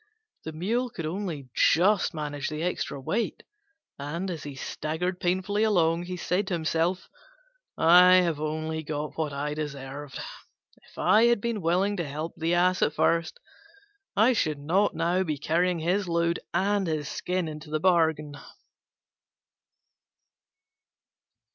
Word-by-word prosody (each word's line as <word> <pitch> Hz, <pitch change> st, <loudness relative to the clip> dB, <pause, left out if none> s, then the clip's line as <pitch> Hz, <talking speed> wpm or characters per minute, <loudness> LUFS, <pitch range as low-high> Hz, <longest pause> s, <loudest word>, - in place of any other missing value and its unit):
The 160 Hz, -, -4 dB
Mule 225 Hz, +11 st, -1 dB
could 165 Hz, -8 st, -6 dB
only 160 Hz, -6 st, -4 dB
just 190 Hz, +4 st, +3 dB
manage 145 Hz, -2 st, -3 dB
the 155 Hz, +1 st, -4 dB
extra 175 Hz, -5 st, -2 dB
weight, 210 Hz, -, -2 dB, 0.6 s
and, 170 Hz, +7 st, -4 dB
as 165 Hz, -4 st, -5 dB
he 145 Hz, -2 st, -7 dB
staggered 160 Hz, +6 st, -3 dB
painfully 190 Hz, +4 st, 0 dB
along, 175 Hz, -5 st, +2 dB
he 180 Hz, 0 st, -5 dB
said 180 Hz, +3 st, -1 dB
to 185 Hz, -, 0 dB
himself, 165 Hz, +2 st, -1 dB, 0.7 s
"I 180 Hz, +2 st, +7 dB
have 170 Hz, -5 st, +2 dB
only 155 Hz, +1 st, -3 dB
got 150 Hz, 0 st, -4 dB
what 155 Hz, -2 st, -2 dB
I 145 Hz, +1 st, -3 dB
deserved: 140 Hz, -2 st, -6 dB, 0.7 s
if -, -, -22 dB
I 210 Hz, +6 st, +4 dB
had 235 Hz, -1 st, +4 dB
been 230 Hz, -1 st, -2 dB
willing 185 Hz, +5 st, +1 dB
to 170 Hz, -4 st, -2 dB
help 155 Hz, +4 st, -5 dB
the 165 Hz, +2 st, 0 dB
Ass 180 Hz, +1 st, +2 dB
at 150 Hz, -, +1 dB
first, 170 Hz, -, +1 dB, 0.8 s
I 225 Hz, +5 st, +5 dB
should 155 Hz, -10 st, 0 dB
not 180 Hz, +8 st, +1 dB
now 175 Hz, +3 st, +1 dB
be 155 Hz, -5 st, -2 dB
carrying 170 Hz, +4 st, +1 dB
his 180 Hz, +4 st, 0 dB
load 170 Hz, 0 st, +1 dB
and 195 Hz, +2 st, +1 dB
his 155 Hz, -3 st, -2 dB
skin 180 Hz, +1 st, -2 dB
into 155 Hz, 0 st, -8 dB
the 155 Hz, 0 st, -1 dB
bargain." 160 Hz, -4 st, +2 dB
170 Hz, 140 wpm, -27 LUFS, 155-185 Hz, 0.8 s, I